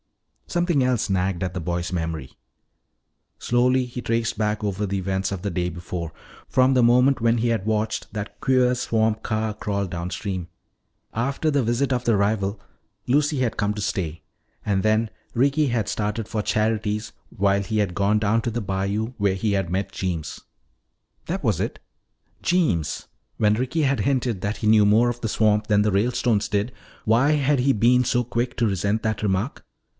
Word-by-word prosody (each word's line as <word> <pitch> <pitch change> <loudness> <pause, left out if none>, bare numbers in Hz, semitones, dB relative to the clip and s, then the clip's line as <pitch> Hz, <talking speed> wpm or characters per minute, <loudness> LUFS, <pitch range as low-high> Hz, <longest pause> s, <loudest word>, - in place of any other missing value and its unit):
Something 175 -5 +1
else 125 -4 +1
nagged 95 -1 0
at 90 -1 -3
the 90 - -3
boy's 85 +2 -3
memory. 80 -6 -3 1.1
Slowly 125 +1 +2
he 125 0 -6
traced 115 -1 -1
back 105 0 -1
over 100 0 -1
the 100 0 -2
events 95 0 -1
of 95 -3 -4
the 100 - -1
day 90 0 -1
before, 85 -1 -5 0.4
from 130 +1 +4
the 125 -2 +4
moment 125 +2 +4
when 115 +1 +3
he 120 +1 +1
had 115 -4 0
watched 110 0 -1
that 105 -1 -6
queer 125 -1 +3
swamp 110 -2 0
car 110 0 -1
crawl 100 -1 -2
downstream. 90 0 -4 0.6
After 140 +7 0
the 140 -3 +2
visit 120 +4 +1
of 125 -1 -1
the 115 -4 +3
rival, 100 0 0 0.5
Lucy 145 +2 +2
had 125 -4 0
come 105 0 0
to 105 - -4
stay. 85 -5 -3 0.4
And 100 -2 +1
then 110 +1 +2 0.3
Ricky 140 +4 +3
had 115 -5 0
started 105 +1 -2
for 110 -2 -2
Charity's 105 0 -1 0.2
while 100 0 +1
he 105 +2 -2
had 100 -4 +1
gone 100 +2 +2
down 110 +2 +2
to 120 - -2
the 120 - -2
bayou 100 +3 -2
where 100 -2 +2
he 100 +2 0
met 95 +2 -3
Jeems. 85 -5 -4 0.9
That - - -3
was - - +1
it. - - -3 0.6
Jeems! 155 - 0 0.3
When 105 -1 +3
Ricky 130 +8 0
had 140 -1 +1
hinted 125 -7 0
that 105 +2 -2
he 110 - -2
knew 105 -1 +6
more 115 +4 +4
of 120 0 -5
the 115 - -2
swamp 105 -1 +2
than 105 -1 +3
the 105 - +1
Ralestones 110 +1 +1
did, 105 +3 -1 0.3
why 120 +7 +4
had 145 -1 +2
he 135 +2 +3
been 125 +2 +4
so 120 0 +1
quick 120 +2 -2
to 120 - +2
resent 100 +2 0
that 110 -1 -1
remark? 100 +5 -1
110 Hz, 180 wpm, -24 LUFS, 100-120 Hz, 1.1 s, knew